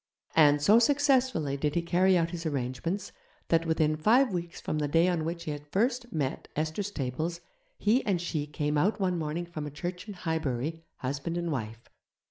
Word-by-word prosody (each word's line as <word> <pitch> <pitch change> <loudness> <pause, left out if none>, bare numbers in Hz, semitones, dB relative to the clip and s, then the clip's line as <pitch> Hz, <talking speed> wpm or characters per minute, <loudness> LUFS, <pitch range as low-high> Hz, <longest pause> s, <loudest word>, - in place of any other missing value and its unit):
And, 145 -2 +5
so 210 +8 +7
successfully 260 - +2
did 145 +1 -1
he 170 - +1
carry 185 +2 +3
out 165 -1 +1
his 170 -2 -5
arrangements, 145 +8 -3 0.4
that 165 0 +2
within 155 -1 +2
five 225 - +4
weeks 170 -1 -4
from 155 - -2
the 150 - 0
day 165 +4 +3
on 170 -3 0
which 170 +1 -3
he 155 - -3
had 145 0 -7
first 240 - 0
met 140 -4 -2
Esther 155 +5 -1
Stables, 165 -3 -3 0.4
he 230 +5 +2
and 195 -4 +1
she 155 -4 -2
came 150 0 -1
out 205 +6 +1
one 180 -3 0
morning 160 +2 -2
from 155 -3 -6
a - - -4
church 175 +6 -6
in 205 - -7
Highbury, 160 -3 -2 0.2
husband 140 +6 -3
and 170 -1 -2
wife. 115 -4 -5
165 Hz, 190 wpm, -29 LUFS, 150-185 Hz, 0.4 s, so